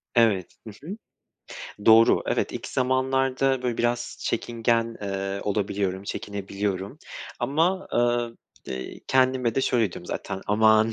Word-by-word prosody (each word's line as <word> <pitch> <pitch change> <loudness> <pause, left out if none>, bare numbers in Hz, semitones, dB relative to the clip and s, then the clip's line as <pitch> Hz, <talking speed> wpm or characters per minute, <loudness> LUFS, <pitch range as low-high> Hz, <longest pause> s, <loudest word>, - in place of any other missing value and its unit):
Evet. 110 -7 +3
Hı - - -5 0.2
hı. 195 - -4 0.9
Doğru. 115 +1 +7
Evet, - - 0
ilk - - -5
zamanlarda 130 0 +1
böyle 120 -2 -1
biraz 120 0 -1
çekingen, 115 0 0
eee, 100 0 -3
olabiliyorum, 100 -2 -1
çekinebiliyorum 100 +3 -4 0.4
ama, 160 +9 +1
eee, 120 - -1
eee, 65 0 -7
kendime 130 -3 +2
de - - +2
şöyle 115 -7 +1
diyorum - - -9
zaten, 95 - -4
aman 110 +1 +4
115 Hz, 120 wpm, -25 LUFS, 100-130 Hz, 0.9 s, Doğru